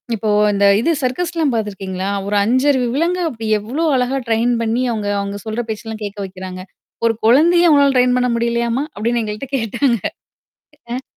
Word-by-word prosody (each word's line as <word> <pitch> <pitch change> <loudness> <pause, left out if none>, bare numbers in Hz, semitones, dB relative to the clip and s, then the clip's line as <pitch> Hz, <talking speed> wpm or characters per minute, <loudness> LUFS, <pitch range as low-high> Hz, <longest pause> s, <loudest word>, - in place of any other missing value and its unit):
இப்போ 215 +1 -2 0.2
இந்த 200 0 +2 0.2
இது 335 - +2
சர்க்கஸ்லாம் 315 +1 -1
பாத்துருக்கீங்களா? 195 -3 -3 0.2
ஒரு 205 0 0
5அறிவு 260 +2 +2
விலங்க 340 +5 0
அப்டி 225 -5 -6
எவ்ளோ 260 +11 -3
அழகா 255 +2 0
ட்ரெயின் 230 +2 +2
பண்ணி 230 +3 0
அவுங்க 205 -2 -3
அவங்க 200 0 -5
சொல்ற 220 +2 -3
பேச்செல்லாம் 220 0 -6
கேக்க 205 0 -6
வைக்குறாங்க! 185 -1 -8 0.4
ஒரு 230 - +3
கொழந்தைய 340 +9 +5
உங்களால 280 -1 +4
ட்ரெயின் 250 0 +3
பண்ண 250 0 +1
முடியலையாமா? 235 +2 0 0.2
அப்படின்னு 235 +1 0
எங்கள்ட 210 +6 -5
கேட்டாங்க. 235 0 0 0.9
ஆ 260 +2 -4
235 Hz, 155 wpm, -18 LUFS, 210-265 Hz, 0.9 s, கொழந்தைய